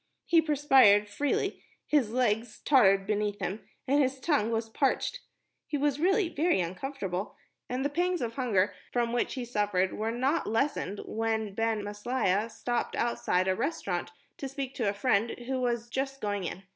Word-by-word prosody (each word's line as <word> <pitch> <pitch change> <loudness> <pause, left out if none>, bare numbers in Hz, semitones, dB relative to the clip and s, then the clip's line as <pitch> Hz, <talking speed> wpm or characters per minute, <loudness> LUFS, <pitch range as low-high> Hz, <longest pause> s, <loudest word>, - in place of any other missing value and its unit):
He 335 -1 +5
perspired 270 -9 +5
freely, 280 +8 -1 0.2
his 285 -8 +2
legs 225 -2 0
tottered 195 -8 +5
beneath 210 0 -1
him, 195 +2 -4 0.2
and 285 +3 +4
his 265 0 0
tongue 270 -7 +1
was 225 0 -1
parched. 275 - 0 0.5
He 295 - -1
was 285 0 0
really 385 +3 +3
very 335 - +1
uncomfortable, 190 +1 -4 0.3
and 255 +2 -2
the - - +2
pangs 355 +4 0
of 230 -1 -3
hunger 225 -7 +1 0.2
from 235 -1 0
which 240 - 0
he 255 -2 -4
suffered 205 -5 0
were 220 +1 -2
not 260 +7 0
lessened 225 -3 -1
when 220 -2 -2
Ben 225 0 0
Maslia 205 0 0
stopped 235 +2 -2
outside 190 -6 0
a 190 - +3
restaurant 190 - -2 0.3
to 275 - -5
speak 270 -1 -5
to 230 -6 0
a - - -1
friend 215 +1 +1
who 260 0 -2
was 240 -1 -1
just 270 +2 -3
going 205 -4 -2
in. 185 +3 -5
235 Hz, 170 wpm, -29 LUFS, 205-270 Hz, 0.5 s, He